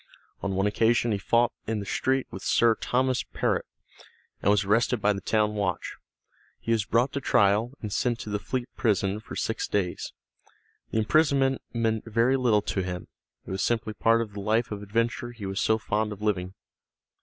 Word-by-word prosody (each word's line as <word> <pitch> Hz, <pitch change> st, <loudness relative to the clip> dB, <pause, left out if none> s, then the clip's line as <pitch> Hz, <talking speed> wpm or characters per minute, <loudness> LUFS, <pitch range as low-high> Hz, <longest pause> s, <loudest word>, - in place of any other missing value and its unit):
On 100 Hz, -1 st, -2 dB
one 95 Hz, +1 st, +1 dB
occasion 115 Hz, +3 st, +2 dB
he 100 Hz, -, 0 dB
fought 120 Hz, +4 st, +2 dB, 0.2 s
in 110 Hz, 0 st, -1 dB
the 100 Hz, -, -5 dB
street 130 Hz, +6 st, 0 dB
with 95 Hz, -, -7 dB
Sir 115 Hz, +2 st, +4 dB
Thomas 130 Hz, +2 st, 0 dB
Perrot, -, -, -1 dB, 0.7 s
and -, -, +2 dB
was 105 Hz, 0 st, +4 dB
arrested 115 Hz, +4 st, +2 dB
by 105 Hz, 0 st, +3 dB
the 100 Hz, -, -5 dB
town 105 Hz, +2 st, +1 dB
watch. 100 Hz, -3 st, -2 dB, 0.6 s
He 115 Hz, -, -3 dB
was 110 Hz, -3 st, +2 dB
brought 120 Hz, +4 st, +1 dB
to 140 Hz, -, -2 dB
trial, 105 Hz, +2 st, +3 dB
and 105 Hz, -2 st, -3 dB
sent 120 Hz, -2 st, +1 dB
to 105 Hz, -, -6 dB
the 105 Hz, -, -1 dB
Fleet 125 Hz, +3 st, -3 dB
prison 100 Hz, -2 st, +1 dB
for 110 Hz, -, -9 dB
six -, -, -2 dB
days. 95 Hz, -4 st, -2 dB, 0.8 s
The -, -, -2 dB
imprisonment 135 Hz, +2 st, +3 dB
meant 115 Hz, -2 st, -1 dB
very 115 Hz, +4 st, +2 dB
little 120 Hz, -5 st, +3 dB
to 95 Hz, -, -1 dB
him, 90 Hz, -1 st, -5 dB, 0.4 s
it -, -, -7 dB
was 95 Hz, -, -2 dB
simply 115 Hz, -2 st, 0 dB
part 115 Hz, +2 st, +3 dB
of 105 Hz, -3 st, -11 dB
the 100 Hz, -, -6 dB
life 110 Hz, +3 st, +1 dB
of 105 Hz, -1 st, -4 dB
adventure 115 Hz, +3 st, -1 dB
he 110 Hz, -4 st, -8 dB
was 95 Hz, +1 st, -2 dB
so 110 Hz, -, +3 dB
fond 105 Hz, 0 st, -1 dB
of 105 Hz, -, -7 dB
living. 95 Hz, -3 st, -1 dB
110 Hz, 190 wpm, -27 LUFS, 100-120 Hz, 0.8 s, Sir